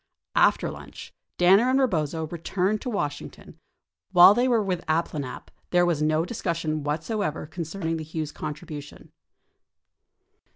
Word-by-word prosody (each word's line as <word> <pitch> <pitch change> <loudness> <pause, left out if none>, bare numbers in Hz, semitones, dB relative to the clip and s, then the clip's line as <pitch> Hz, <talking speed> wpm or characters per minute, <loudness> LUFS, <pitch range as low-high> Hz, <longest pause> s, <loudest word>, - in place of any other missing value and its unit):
After - - +3
lunch, - - -11 0.2
Danner 195 +7 +5
and 265 +1 +3
Eebozo 160 - 0
returned 185 +4 -1
to 255 - -4
Washington. 150 -10 -5 0.5
While 180 +1 +9
they 245 +4 +2
were 235 -4 +2
with 185 -3 -1
the - - -18
Abplanalps, 155 -5 -3 0.2
there 175 0 +3
was 170 -4 0
no 155 +2 +2
discussion 165 -7 -2
whatsoever 155 +3 -2
concerning 165 +1 -4
the 160 - -5
Hughes 155 -1 -5
contribution. 150 -1 -8
165 Hz, 130 wpm, -25 LUFS, 155-195 Hz, 0.5 s, While